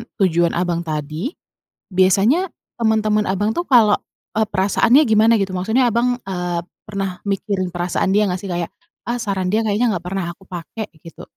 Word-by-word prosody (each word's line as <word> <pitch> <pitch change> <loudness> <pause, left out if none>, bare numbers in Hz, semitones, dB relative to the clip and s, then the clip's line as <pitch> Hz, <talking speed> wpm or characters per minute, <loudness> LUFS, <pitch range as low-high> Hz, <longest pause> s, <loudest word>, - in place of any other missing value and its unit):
tujuan 175 -3 +2
Abang 175 -1 -1
tadi, 155 - -3 0.5
biasanya 195 - +3 0.3
teman-teman 215 -2 +2
Abang 205 +3 0
tuh 345 - 0
kalau 225 -8 +5 0.4
eee, 220 - +3
perasaannya 205 +7 +3
gimana 220 +1 +5
gitu? 195 - -1
Maksudnya 220 +7 +2
Abang, 245 +2 +1
eee, 180 -3 -3 0.2
pernah 195 -3 -4
mikirin 195 -2 -2
perasaan 175 +2 0
dia 210 +1 +3
nggak 180 -1 -2
sih 195 - -4
kayak, 175 -1 -1 0.4
"Ah, 240 - 0
saran 200 -6 -2
dia 215 +4 +1
kayaknya 220 +3 +1
enggak 175 - -5
pernah 185 +1 -3
aku 190 - -21
pakai," 185 +4 -7
gitu. 165 - -12
195 Hz, 165 wpm, -20 LUFS, 180-220 Hz, 0.5 s, kalau